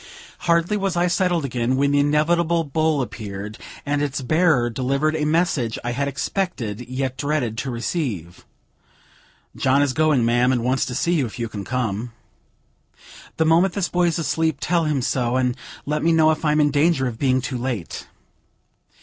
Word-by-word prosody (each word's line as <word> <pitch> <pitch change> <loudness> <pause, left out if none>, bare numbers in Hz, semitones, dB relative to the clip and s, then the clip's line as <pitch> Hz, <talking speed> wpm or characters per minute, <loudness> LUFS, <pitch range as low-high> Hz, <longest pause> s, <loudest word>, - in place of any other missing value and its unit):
Hardly 170 +5 +3
was 195 -3 -1
I 175 - +3
settled 175 -3 +1
again, 125 0 -1
when 140 +1 +2
the 145 - +3
inevitable 165 +3 +2
bowl 155 -1 0
appeared, 105 -2 -7 0.3
and 145 0 0
its 145 -1 -1
bearer 155 -3 +3
delivered 135 +6 0
a 155 -1 0
message 150 -8 +1
I 120 - -2
had 140 +3 -1
expected, 130 - -3
yet 130 0 -3
dreaded 145 -6 -1
to 135 - -3
receive: 115 - -4 1.1
"John 135 +2 +3
is 140 -2 0
going, 155 -6 +2
ma'am, 120 +2 +3
and 120 -3 0
wants 130 +2 +1
to 125 - -4
see 170 +6 +1
you, 145 -7 +1
if 110 - -10
you 115 -1 -2
can 105 -2 -6
come." 120 -1 -3 1.2
"The 160 - +2
moment 170 +3 +3
this 190 -3 -1
boy 175 0 +2
is 165 - 0
asleep; 160 -1 0
tell 170 0 +1
him 145 -4 0
so, 125 -1 0
and 125 -1 +1 0.3
let 150 +1 -1
me 165 - +3
know 160 -1 +5
if 155 - -3
I 150 - +3
am 150 - +2
in 145 -1 +3
danger 145 -1 +2
of 115 -3 -4
being 130 -2 +2
too 130 0 -4
late." 120 -9 -4
140 Hz, 185 wpm, -22 LUFS, 125-160 Hz, 1.2 s, know